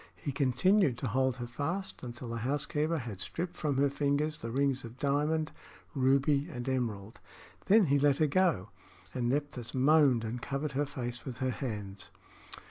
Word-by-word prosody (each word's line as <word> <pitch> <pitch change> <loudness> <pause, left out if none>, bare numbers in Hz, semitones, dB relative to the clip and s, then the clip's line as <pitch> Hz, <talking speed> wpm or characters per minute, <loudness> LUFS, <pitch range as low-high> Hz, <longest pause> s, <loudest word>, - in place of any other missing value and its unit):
He 145 - -4
continued 140 - +3
to 130 - -3
hold 130 +2 +1
her 120 -1 -5
fast 160 +11 -4
until 120 0 -7
the 115 - -3
housekeeper 150 +6 0
had 115 -8 -6
stripped 175 - -4
from 145 -4 -1
her 140 +1 +4
fingers 145 +2 0
the 115 - -5
rings 135 +1 0
of 115 +1 -10
diamond, 150 +2 0 0.4
ruby 140 +1 +2
and 120 +1 -6
emerald. 115 -5 -2 0.5
Then 210 +1 +6
he 140 -2 +3
let 140 -1 +4
her 155 - +3
go, 155 - +2 0.4
and 120 -2 -1
Nephthys 135 -4 -2
moaned 135 -3 +4
and 115 +2 -4
covered 140 +3 -3
her 140 +2 0
face 120 -3 -5
with 130 -3 -6
her 130 -1 0
hands. 105 -7 -5
135 Hz, 170 wpm, -31 LUFS, 120-150 Hz, 0.5 s, Then